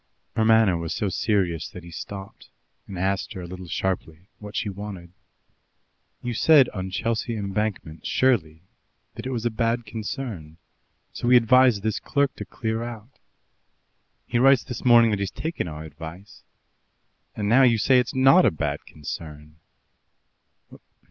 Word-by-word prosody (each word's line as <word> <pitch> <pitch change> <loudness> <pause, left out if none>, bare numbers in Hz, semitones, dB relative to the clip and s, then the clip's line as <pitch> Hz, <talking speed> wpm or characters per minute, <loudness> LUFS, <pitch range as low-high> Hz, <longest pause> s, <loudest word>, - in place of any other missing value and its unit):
Her 110 - +2
manner 110 -5 +4
was 85 -1 -4
so 105 - -1
serious 95 -4 0
that 90 - -11
he 85 - -11
stopped, 95 +4 -9 0.4
and 95 - -7
asked 95 +3 -1
her 95 - -7
a - - -7
little 90 +1 -9
sharply 90 0 -3
what 105 -1 -10
she - - -1
wanted. 100 -3 -7 1.1
"You 120 -1 -2
said 140 +2 +5
on 95 -1 -5
Chelsea 115 +4 -2
Embankment, 100 -5 -3
surely, 85 -12 +1 0.5
that - - -7
it - - -3
was 120 -3 -3
a 120 - +1
bad 115 +2 -1
concern, 110 - -6 0.6
so - - -4
we 125 0 +7
advised 120 -2 +4
this 110 -1 -1
clerk 140 -2 0
to - - -6
clear 110 0 -3
out. 120 +1 -8 1.1
He 120 - 0
writes 135 -1 +5
this 125 -3 -7
morning 120 -2 +6
that 105 - -1
he's 100 -1 -1
taken 160 - -4
our 75 -1 -7
advice, 80 +6 -11 0.9
and 105 - -2
now 120 +5 +5
you 120 -3 +5
say 125 +4 +4
it's 125 +2 -2
not 135 +8 +6
a - - +5
bad 75 -4 -3
concern. 75 0 -8
105 Hz, 155 wpm, -24 LUFS, 90-120 Hz, 1.1 s, we